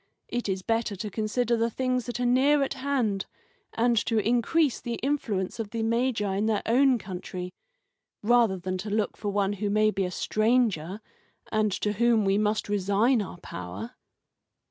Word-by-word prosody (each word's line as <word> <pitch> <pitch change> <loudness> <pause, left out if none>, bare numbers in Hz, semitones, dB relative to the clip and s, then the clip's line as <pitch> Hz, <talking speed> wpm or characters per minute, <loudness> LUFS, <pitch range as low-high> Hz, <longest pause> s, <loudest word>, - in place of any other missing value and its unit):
It 240 -3 -2
is 190 -1 -2
better 225 -1 0
to 210 +2 -5
consider 230 +3 0
the 230 0 +1
things 255 +1 -1
that 245 - -4
are 250 - 0
near 275 +4 +4
at 275 - -2
hand, 260 -8 -1 0.5
and 235 +1 +2
to 225 - +1
increase 245 +7 +2
the 235 -1 -3
influence 230 -9 -1
of 220 -2 -3
the 225 +1 -3
Magi 225 -4 0
in 210 +2 +1
their 215 -2 0
own 260 +2 +4
country, 180 -2 -6 0.7
rather 230 -3 +4
than 185 +1 -4
to 210 +3 -5
look 210 0 0
for 205 - -4
one 200 0 +1
who 205 +1 -2
may 215 +1 +3
be 195 -2 -1
a - - -2
stranger, 215 -3 0 0.5
and 215 -1 +2
to 210 +2 -1
whom 230 0 +3
we 195 +1 +2
must 215 0 0
resign 205 +4 +2
our 190 - -7
power." 90 +6 -7
215 Hz, 175 wpm, -27 LUFS, 200-240 Hz, 0.7 s, near